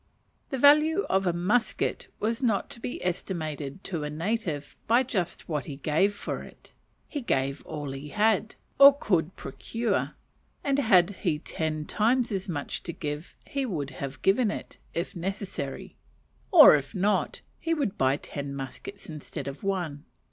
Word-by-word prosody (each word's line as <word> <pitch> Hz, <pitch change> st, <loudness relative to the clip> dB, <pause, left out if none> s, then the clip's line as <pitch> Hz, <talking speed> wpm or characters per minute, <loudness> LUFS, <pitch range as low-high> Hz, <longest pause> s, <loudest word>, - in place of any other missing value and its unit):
The 270 Hz, -, -2 dB
value 305 Hz, +7 st, +6 dB
of 190 Hz, 0 st, +2 dB
a -, -, +4 dB
musket 190 Hz, +8 st, 0 dB
was 225 Hz, +4 st, -1 dB
not 220 Hz, -6 st, +1 dB
to -, -, -6 dB
be 230 Hz, -, -5 dB
estimated 160 Hz, -3 st, -3 dB
to 165 Hz, -5 st, -3 dB
a 150 Hz, -, -3 dB
native 165 Hz, -2 st, -2 dB
by 235 Hz, +3 st, +5 dB
just 185 Hz, -9 st, -3 dB
what 150 Hz, -6 st, -2 dB
he 145 Hz, -, -6 dB
gave 160 Hz, +8 st, +1 dB
for -, -, -4 dB
it: -, -, -14 dB, 0.3 s
he 290 Hz, -, -4 dB
gave 135 Hz, -, 0 dB
all 145 Hz, -2 st, -4 dB
he 135 Hz, +2 st, -7 dB
had, 215 Hz, +1 st, +2 dB, 0.2 s
or 280 Hz, 0 st, +10 dB
could 180 Hz, -, 0 dB
procure, 230 Hz, -, -2 dB, 0.5 s
and 280 Hz, 0 st, +2 dB
had 190 Hz, -7 st, +5 dB
he 150 Hz, -, 0 dB
ten 155 Hz, 0 st, -3 dB
times 235 Hz, +5 st, +2 dB
as 195 Hz, 0 st, -3 dB
much 145 Hz, -5 st, -3 dB
to 170 Hz, -, -5 dB
give, 150 Hz, -1 st, -5 dB
he 275 Hz, -1 st, -2 dB
would 155 Hz, -, -3 dB
have 135 Hz, +1 st, -7 dB
given 210 Hz, +4 st, +4 dB
it, -, -, -6 dB, 0.2 s
if 175 Hz, +4 st, -3 dB
necessary; 185 Hz, -6 st, -4 dB, 0.5 s
or -, -, +10 dB
if 140 Hz, -2 st, -3 dB
not, 200 Hz, +3 st, +1 dB, 0.2 s
he 330 Hz, 0 st, 0 dB
would 275 Hz, -11 st, -1 dB
buy 135 Hz, +1 st, +2 dB
ten 140 Hz, -2 st, -6 dB
muskets 135 Hz, +9 st, -8 dB
instead 150 Hz, -2 st, -7 dB
of 140 Hz, 0 st, -6 dB
one. 175 Hz, -7 st, -2 dB
180 Hz, 160 wpm, -28 LUFS, 150-225 Hz, 0.5 s, or